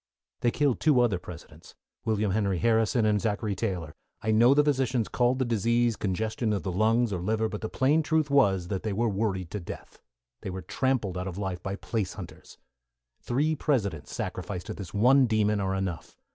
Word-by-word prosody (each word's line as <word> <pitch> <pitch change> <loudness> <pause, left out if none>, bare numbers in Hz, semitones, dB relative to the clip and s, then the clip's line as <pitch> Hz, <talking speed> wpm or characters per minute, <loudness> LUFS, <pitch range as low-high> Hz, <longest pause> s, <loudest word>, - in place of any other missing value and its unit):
They 120 - +2
killed 135 +1 +1
two 150 -5 +4
other 115 -7 +2
Presidents, 85 -2 -12 0.3
William 105 -2 +1
Henry 100 -2 0
Harrison 115 +2 +2
and 105 -2 +2
Zachary 105 -1 -1
Taylor. 90 -7 -3 0.3
I 110 - +1
know 120 +5 +5
the 150 - +5
physicians 130 -5 +1
called 125 +1 +1
the 130 - 0
disease 115 +1 +1
congestion 110 +3 -1
of 100 - -2
the 95 - -2
lungs 110 +4 +2
or 90 - -3
liver, 110 +4 0
but 105 - -6
the 110 - -3
plain 145 +5 +2
truth 155 -2 0
was 95 -10 +3
that 95 -2 -2
they 110 -2 -2
were 115 +4 +1
worried 95 -4 -2
to 105 - -3
death; 85 - -9 0.4
they - - -5
were 95 0 -6
trampled 115 -9 -1
out 90 - -4
of 90 -1 -6
life 95 -3 -3
by 95 +1 -4
place 105 -2 -3
hunters. - - -11 0.6
Three 150 +6 0
Presidents 100 - -1
sacrificed 90 - -4
to - - -5
this 95 -4 -8
one 125 +5 +5
demon 105 -2 +1
are 95 0 -1
enough. 95 -3 -4
110 Hz, 195 wpm, -27 LUFS, 95-120 Hz, 0.6 s, know